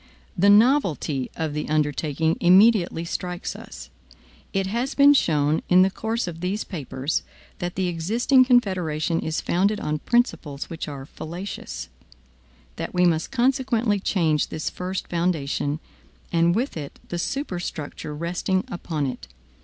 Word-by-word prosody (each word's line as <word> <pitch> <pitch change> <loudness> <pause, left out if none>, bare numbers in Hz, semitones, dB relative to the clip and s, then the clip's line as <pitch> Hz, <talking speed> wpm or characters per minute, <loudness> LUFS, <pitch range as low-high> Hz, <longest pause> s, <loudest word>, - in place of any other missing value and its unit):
The 200 +2 +4
novelty 205 - +3
of 160 -2 -2
the 150 0 -3
undertaking 155 +1 +1
immediately 185 -2 +5
strikes 180 +1 -4
us. - - -10 0.6
It 195 -1 0
has 235 +7 -2
been 285 0 +7
shown 155 - +2
in 185 +1 +7
the 190 - +2
course 225 +1 -2
of 165 -2 -6
these 190 +4 -2
papers, 145 -4 -3 0.4
that 175 0 -3
the 190 - 0
existing 225 - +3
Confederation 180 - +1
is 160 0 -2
founded 200 +4 +1
on 150 0 -2
principles 175 - 0
which 165 - -5
are 140 -2 -7
fallacious; 175 +7 -7 0.9
that 165 +2 -5
we 180 0 +4
must 165 -2 +1
consequently 245 -4 +1
change 160 -6 +1
this 155 - -4
first 185 +1 -4
foundation, 155 -4 -1 0.5
and 170 +1 +3
with 250 +6 -1
it 145 -3 -7
the 175 - -3
superstructure 175 - -4
resting 175 +4 -1
upon 160 -5 -3
it. 95 - -5
175 Hz, 140 wpm, -24 LUFS, 155-205 Hz, 0.9 s, been